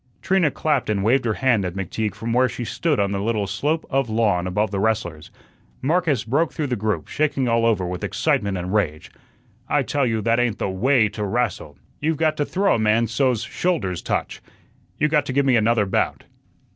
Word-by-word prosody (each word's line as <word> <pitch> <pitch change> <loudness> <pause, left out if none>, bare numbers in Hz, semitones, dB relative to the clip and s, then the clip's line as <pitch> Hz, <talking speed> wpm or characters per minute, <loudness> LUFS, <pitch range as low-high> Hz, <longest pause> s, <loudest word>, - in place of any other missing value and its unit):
Trina 190 -4 +3
clapped 145 -5 -1
and 100 -2 0
waved 120 +4 +2
her 110 -2 0
hand 120 -6 +2
at 90 -1 -4
McTeague 100 +3 -3
from 115 +1 -3
where 125 +1 +3
she 120 - -5
stood 155 +4 -1
on 100 -1 +1
the 100 -1 -2
little 110 -1 0
slope 145 +12 -1
of 135 -3 +1
lawn 105 -5 +1
above 105 +3 0
the 100 - -2
wrestlers. 95 -8 -1 0.5
Marcus 155 - +1
broke 145 +9 0
through 155 - -3
the 130 -3 -1
group, 105 -1 -2
shaking 145 -4 0
all 115 0 +2
over 100 -5 +1
with 90 +2 -5
excitement 105 - 0
and 90 +2 -4
rage. 80 -8 -1 0.6
"I - - +2
tell 140 -3 0
you 110 -2 -1
that 115 +2 +2
ain't 120 -4 0
the - - -2
WAY 115 +4 +3
to 105 +1 -5
rastle. 100 - -2 0.2
You've 155 +1 0
got 155 0 +1
to 145 - 0
throw 195 +5 +1
a - - +1
man 110 +2 +3
so's 120 0 0
his - - -13
shoulders 115 - -1
touch. - - -3 0.6
You 150 - +2
got 150 -2 +1
to 130 - -3
give 140 +1 +2
me 130 -2 +4
another 110 -1 +3
bout." 95 - -1
115 Hz, 210 wpm, -22 LUFS, 100-140 Hz, 0.6 s, me